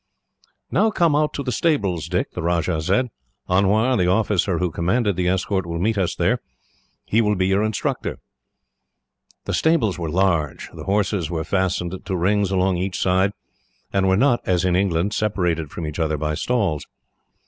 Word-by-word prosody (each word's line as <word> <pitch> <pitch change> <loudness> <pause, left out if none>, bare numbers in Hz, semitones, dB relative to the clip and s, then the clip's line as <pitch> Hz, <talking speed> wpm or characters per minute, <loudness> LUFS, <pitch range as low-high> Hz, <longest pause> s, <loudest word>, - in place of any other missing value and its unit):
"Now 220 - +3
come 170 -7 +2
out 150 0 +2
to 140 - -3
the 125 - -2
stables, 100 - 0
Dick," - - -1
the 90 - -5
Rajah 85 -1 0
said. 105 +9 +1 0.4
"Anwar, 105 +7 +3
the 90 -6 +2
officer 100 -2 +1
who 90 0 -1
commanded 100 +6 0
the 90 0 0
escort, 95 +1 0
will 85 0 -3
meet 110 +6 +1
us 95 -4 0
there. - - +1 0.7
He 115 - +2
will 105 -1 +2
be 95 -1 +1
your 95 +2 +2
instructor." 110 -1 -2 1.3
The - - -2
stables 130 - +2
were 85 -2 -3
large. 85 -5 0
The - - -9
horses 100 -4 0
were 80 -2 -2
fastened 95 0 -1
to 95 - -3
rings 100 +3 +1
along 95 -1 +1
each 90 +1 -2
side, 95 +2 +2 0.6
and 95 -1 +2
were 95 0 +3
not, 120 0 +3
as 90 0 +1
in 90 -1 +2
England, 95 +1 +1
separated 90 -8 -1
from 80 - -6
each 75 +2 -5
other 80 -2 0
by 75 +1 -2
stalls. 95 -5 -1
95 Hz, 175 wpm, -22 LUFS, 85-105 Hz, 1.3 s, Now